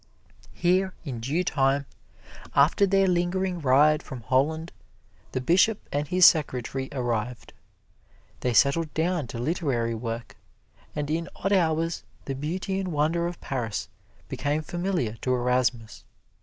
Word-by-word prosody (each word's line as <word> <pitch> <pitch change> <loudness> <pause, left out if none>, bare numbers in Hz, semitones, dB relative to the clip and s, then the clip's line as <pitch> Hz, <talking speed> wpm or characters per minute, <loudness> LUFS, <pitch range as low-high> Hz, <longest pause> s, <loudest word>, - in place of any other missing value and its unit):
Here 185 +2 +1
in 130 -6 -4
due 145 +10 -1
time, 140 -3 +1 0.7
after 155 +8 +4
their 195 0 +3
lingering 180 +1 0
ride 150 +3 +4
from 130 -3 -8
Holland, 150 +8 0 0.6
the - - -1
Bishop 185 - +2
and 145 +1 -1
his 180 +3 +5
secretary 130 -3 +2
arrived. 120 -3 -3 0.9
They 125 - 0
settled 145 +6 +3
down 165 -3 0
to 115 - -7
literary 120 -4 -1
work; 115 -1 -5 0.6
and 150 -1 -2
in 165 +2 -2
odd 195 +2 -1
hours 165 -2 +1 0.2
the 135 - -3
beauty 180 +7 -3
and 185 -2 -3
wonder 160 +3 +1
of 175 - -6
Paris 120 -6 -3 0.4
became 150 +2 -2
familiar 175 - -2
to 125 +3 0
Erasmus. 125 -3 0
150 Hz, 130 wpm, -26 LUFS, 125-175 Hz, 0.9 s, his